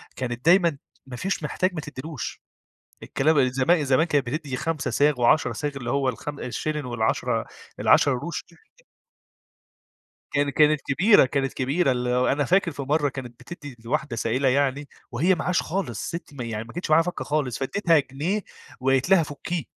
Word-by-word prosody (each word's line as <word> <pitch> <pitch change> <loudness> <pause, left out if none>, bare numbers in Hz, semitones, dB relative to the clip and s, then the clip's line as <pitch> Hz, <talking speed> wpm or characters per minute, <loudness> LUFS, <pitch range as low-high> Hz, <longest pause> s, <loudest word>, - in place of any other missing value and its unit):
كانت 125 +1 -5
دايمًا 170 -3 +4 0.3
ما 125 - -7
فيش 190 -1 -2
محتاج 185 +5 -1
ما 160 - -4
تديلوش. 150 -1 -7 0.6
الكلام 140 -2 +2
زما 135 +6 +2
زمان 135 +5 +3
كانت 145 -5 +1
بتدي 140 -1 -3
5 155 0 -2
صاغ 145 -3 +2
و10 120 +6 +3
صاغ 150 -1 -3
اللي 120 -3 -4
هو 140 0 +1
الخم 140 +4 -4
الشلن، 150 +4 -3
والعَشرة 120 -3 -1 0.3
ال10 135 -3 +4
قروش. 170 +7 -5 1.9
كان 145 0 +1
كانت 150 0 +3
كبيرة، 180 +4 +5
كانت 135 0 -1
كبيرة 135 +3 +1
ال 125 0 -1
أنا 125 +4 +2
فاكر 185 +2 +2
في 145 -1 -6
مرة 145 +1 +1
كانت 125 -3 -9
بتدي 145 0 -10
لواحدة 135 +1 -2
سائلة 120 +4 0
يعني، 140 +1 0 0.2
وهي 170 +10 +2
معهاش 175 +2 0
خالص. 160 - -3
ستي 165 -4 -7
م 125 - -7
يعني 115 -2 -4
ما 115 - -13
كانتش 175 -2 -4
معاها 160 +2 +7
فكة 180 +1 -4
خالص، 145 -5 -1
فاديتها 165 +4 +2
جنيه 155 +10 -2 0.4
وقالت 135 +4 +1
لها 190 -4 +6
فكيه. 150 +2 -4
145 Hz, 165 wpm, -24 LUFS, 130-160 Hz, 1.9 s, معاها